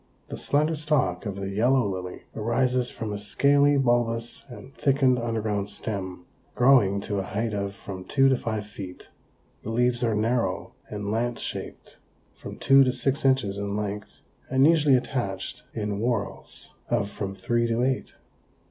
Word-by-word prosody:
The - - -5
slender 150 +3 +2
stalk 145 - 0
of 100 - -4
the 100 0 -4
Yellow 120 +3 +3
Lily 90 -2 -5
arises 125 +3 +1
from 110 -2 -5
a 100 - -4
scaly 140 +7 +3
bulbous 120 -3 0
and 130 +2 -11
thickened 135 -3 +2
underground 110 -3 -1
stem, 95 -4 -4 0.3
growing 120 -7 +5
to 100 0 -2
a - - 0
height 105 +4 -2
of 100 -1 -3
from 95 -2 -8
two 135 +6 +3
to 135 - +4
five 110 -4 -3
feet. 95 -3 -9 0.5
The - - -6
leaves 120 +1 +1
are 115 -2 +2
narrow 115 +3 0 0.2
and 105 -1 -4
lance 120 +2 -1
shaped, - - -6 0.4
from - - -9
two 135 0 +6
to 130 - +2
six 135 +3 -1
inches 130 -7 +2
in 100 0 -3
length 105 0 -5 0.3
and 130 +1 +4
usually 150 -4 +5
attached 110 -7 -4
in 105 -2 -3
whorls 115 -3 -3 0.2
of 105 -4 0
from 100 -2 -4
three 115 +5 0
to 115 +1 +1
eight. 130 0 -1
115 Hz, 160 wpm, -26 LUFS, 100-130 Hz, 0.5 s, two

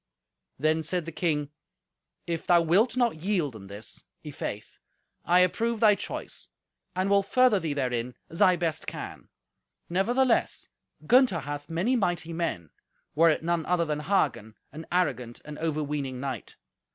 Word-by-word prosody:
Then 155 +3 +2
said 170 +1 -1
the 165 - -6
king, 150 -3 -1 0.7
"If 170 -1 -4
thou 175 -1 +6
wilt 200 +10 +3
not 240 -8 +2
yield 175 - 0
in 100 -2 -10
this, 100 +2 -7 0.2
i'faith, - - -6 0.5
I 180 +1 +5
approve 230 +5 +1
thy 215 -2 +6
choice, 200 - -3 0.5
and 185 +1 0
will 200 0 +4
further 245 +1 +3
thee 160 -4 -3
therein 125 -3 -2
as 165 - -6
I 185 - +6
best 165 -3 -2
can. - - -7 0.6
Nevertheless, 235 +8 +1 0.4
Gunther 245 - +4
hath 145 +2 -6
many 180 +10 +1
mighty 175 -6 -1
men, 160 - -3 0.4
were 165 +3 +5
it 155 - +1
none 170 -1 0
other 175 -1 +2
than 150 -1 -2
Hagen, 150 - 0 0.2
an 160 +2 -9
arrogant 130 -10 0
and 150 0 -8
overweening 150 -4 -2
knight. 130 -4 -5
165 Hz, 150 wpm, -27 LUFS, 145-190 Hz, 0.7 s, thou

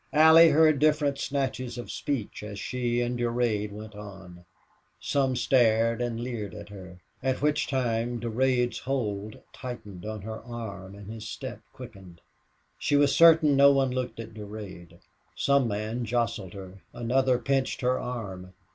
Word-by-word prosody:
Allie 160 +2 +8
heard 155 -2 +4
different 150 -2 +2
snatches 130 -3 -2
of 120 - -6
speech 135 -8 -3
as 105 -1 -7
she 120 0 -1
and 120 0 -2
Durade 115 -3 0
went 105 +1 -9
on. 95 -4 -11 0.5
Some 135 -2 0
stared 115 -1 +3
and 120 -1 -2
leered 115 -6 -5
at 105 -1 -9
her, 95 -3 -11 0.2
at 130 +1 -1
which 150 0 +1
times 120 -2 -1
Durade's 125 +1 +1
hold 110 -6 -3 0.2
tightened 110 -8 -8
on 110 -2 -6
her 110 +1 -6
arm 100 -5 -7
and 100 +1 -10
his 110 0 -7
step - - -7
quickened. 90 -3 -12 0.6
She 145 - +1
was 145 -1 +4
certain 160 -3 +6
no 140 +1 +7
one 135 -2 +2
looked 125 -2 -3
at 115 -1 -8
Durade. 100 -5 -9 0.4
Some 140 -3 +2
man 110 +3 -3
jostled 115 -5 -2
her, 95 0 -10
another 125 +2 +1
pinched 135 +2 -1
her 125 0 +1
arm. 95 -7 -6
120 Hz, 150 wpm, -27 LUFS, 105-130 Hz, 0.6 s, Allie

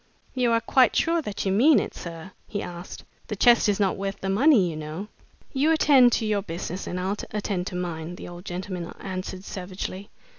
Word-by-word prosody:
"You 250 -2 +1
are 230 - +3
quite 255 +2 +4
sure 335 0 +2
that 210 -8 -4
you 190 - +1
mean 255 +10 +5
it, - - -4
sir?" 170 +1 -8 0.2
he 205 - -3
asked. 175 +1 -8 0.2
"The 210 - -3
chest 235 +1 +5
is 205 - +1
not 195 -2 +1
worth 195 0 -4
the 195 - -2
money, 230 - +5
you 165 - -4
know." 155 +7 -6 0.4
"You 285 +3 +2
attend 275 -6 +6
to 225 - +1
your 210 -2 +1
business 180 0 -5
and 180 - -3
I'll 190 +3 -1
attend 200 -3 -2
to - - -5
mine!" 175 -1 -4
the - - -9
old 175 0 -9
gentleman 180 -1 -5
answered, 185 0 -5
savagely. 190 +1 -6
195 Hz, 200 wpm, -25 LUFS, 180-230 Hz, 0.4 s, attend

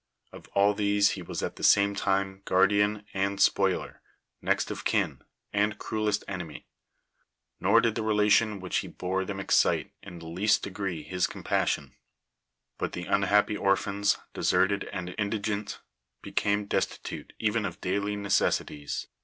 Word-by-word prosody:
Of - - -12
all 100 +1 +5
these 100 0 +3
he 95 - -5
was 85 - -5
at - - -4
the - - -9
same 100 0 +5
time 95 -1 -1
guardian 105 +2 +3
and 100 +1 -1
spoiler, 95 -1 +2 0.4
next - - 0
of - - -5
kin, - - 0 0.3
and 105 0 +1
crudest 105 -1 -1
enemy; 90 -6 -6 0.9
nor - - +5
did 115 -2 +1
the 115 - -2
relation 105 0 +3
which 90 -1 -2
he - - -2
bore 95 +1 -2
them 95 0 -5
excite 95 - +2
in 90 -3 -10
the 85 - -11
least 95 +6 +1
degree 95 -5 -4
his 90 +4 0
compassion; - - -1 0.9
but - - -2
the 90 - -5
unhappy 100 +2 +2
orphans, 100 0 +1 0.2
deserted 100 +1 +2
and 90 -2 -5
indigent, 105 0 -2 0.4
became 105 0 0
destitute - - -3
even 110 0 0
of 90 -4 -4
daily 100 +2 -1
necessities. 100 -7 0
100 Hz, 145 wpm, -28 LUFS, 95-105 Hz, 0.9 s, all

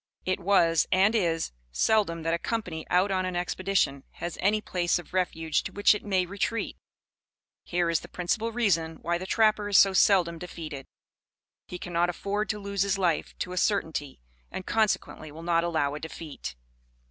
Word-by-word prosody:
It 185 +1 0
was, 170 -4 +3
and 195 +4 +4
is, 170 -7 0 0.2
seldom 165 - +1
that 165 +1 0
a 170 - 0
company 180 -9 -3
out 185 +3 +3
on 185 -1 +1
an 185 -1 -3
expedition 180 -5 0
has 175 -1 -5
any 210 +3 +3
place 175 -5 0
of 175 0 -10
refuge 165 -4 0
to - - -6
which 205 +1 +4
it 210 - -5
may 190 -3 +1
retreat. 200 +5 -2 0.9
Here 175 -1 0
is 165 -1 +2
the - - -11
principal 215 +6 -1
reason 170 -9 +1
why 170 +1 0
the 185 - -6
trapper 215 -1 +2
is 200 - +5
so 195 -1 +6
seldom 175 -3 +4
defeated. 160 -6 -7 0.8
He 180 - -6
cannot 175 0 0
afford 200 +3 -2
to 210 - -1
lose 200 -1 -3
his 200 0 +1
life 175 -5 0
to 180 - -4
a - - -6
certainty, 160 -8 -1 0.3
and 185 - -6
consequently 210 -8 0
will 160 +2 -10
not 170 -1 +2
allow 160 -4 0
a 150 - -5
defeat. 160 - -7
180 Hz, 180 wpm, -27 LUFS, 165-200 Hz, 0.9 s, so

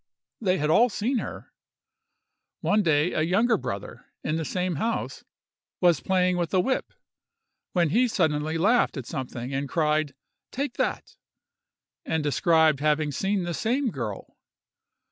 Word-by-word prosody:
They 190 -3 +2
had 150 -1 0
all 240 +9 +5
seen 235 +5 -1
her. - - -8 1.1
One 210 +1 +2
day 155 -2 +2
a - - 0
younger 200 +9 +3
brother, 100 - -6 0.2
in 155 - -1
the 160 - -1
same 180 +1 -2
house, 230 +9 -2 0.6
was 175 -5 +4
playing 180 +3 +1
with 170 -2 -1
a - - +5
whip, 260 +8 -1 0.8
when 175 -4 +2
he 240 +10 +3
suddenly 155 -6 0
laughed 215 +1 +2
at 130 - -5
something, 125 0 -5
and 135 0 -2
cried 155 -2 0 0.4
"Take 280 +2 -3
that;" - - -2 0.9
and 160 - -1
described 160 0 +3
having 150 0 +1
seen 195 +6 -1
the 175 0 -3
same 245 - 0
girl. 115 - -6
170 Hz, 145 wpm, -26 LUFS, 150-205 Hz, 1.1 s, all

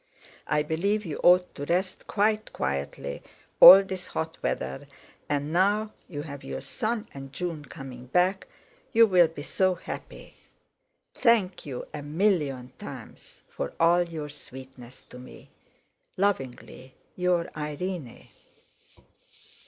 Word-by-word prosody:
I 150 0 +1
believe 200 +8 -1
you 155 -4 -5
ought 180 0 +5
to 145 - -6
rest 185 +4 -1
quite 215 +1 0
quietly 70 +1 -3 0.4
all 195 +1 +12
this 190 -1 -6
hot 160 0 -4
weather, 65 +1 -3 0.4
and 145 +1 -1
now 205 +4 +2 0.2
you 145 -4 -5
have 140 -3 -9
your - - -5
son 225 -1 -3
and 135 -1 -9
June 165 -1 -5
coming 130 -5 -10
back 180 +7 +1 0.5
you 230 0 +7
will 180 -5 +5
be 155 -2 -9
so 185 +3 +1
happy. 175 - -9 0.8
Thank 210 - +2
you 130 -3 -5
a 150 - -5
million 145 -6 0
times - - -11
for 70 - -5
all 170 +1 +5
your 160 -4 -5
sweetness 130 -3 -12
to 125 - -13
me. 125 - -14 0.7
"Lovingly 135 -8 -3 0.2
your 180 -2 0
IRENE." 150 -2 -5
165 Hz, 125 wpm, -27 LUFS, 140-190 Hz, 0.8 s, all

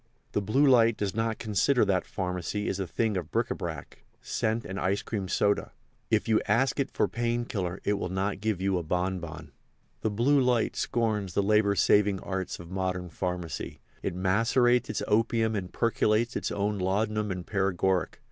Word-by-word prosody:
The 105 - 0
Blue 130 +9 +2
Light 115 -4 +5
does 100 -3 -2
not 115 0 -1
consider 115 +3 +2
that 95 -3 0
pharmacy 90 +2 -3
is 95 - -2
a 95 - -2
thing 110 +4 0
of 90 - -4
bric - - 0
a - - 0
brac, - - -7 0.2
scent 110 +1 -1
and 95 - -5
ice 95 +3 0
cream 100 -4 -3
soda. 100 +2 +1 0.4
If - - +1
you 110 -1 +3
ask 130 +7 +2
it 140 - 0
for - - +1
pain 120 0 -1
killer 90 -5 -3
it 105 - +1
will 90 - -3
not 95 +1 -2
give 110 -4 0
you 95 -1 +1
a - - -5
bonbon. 85 -1 -3 0.5
The 110 - +1
Blue 130 +7 +3
Light 125 -3 +1
scorns 105 -6 -1
the 100 - +3
labour 105 0 +3
saving 100 0 +3
arts 95 -1 -4
of 85 0 -10
modern 90 -2 -2
pharmacy. 90 -1 -4 0.2
It - - -3
macerates 115 +6 +2
its - - -2
opium 110 +1 +2
and 90 -3 -4
percolates 115 0 +1
its - - -2
own 105 0 -1
laudanum 105 +3 0
and 90 -2 -4
paregoric. 95 -3 0
100 Hz, 185 wpm, -28 LUFS, 95-115 Hz, 0.5 s, Light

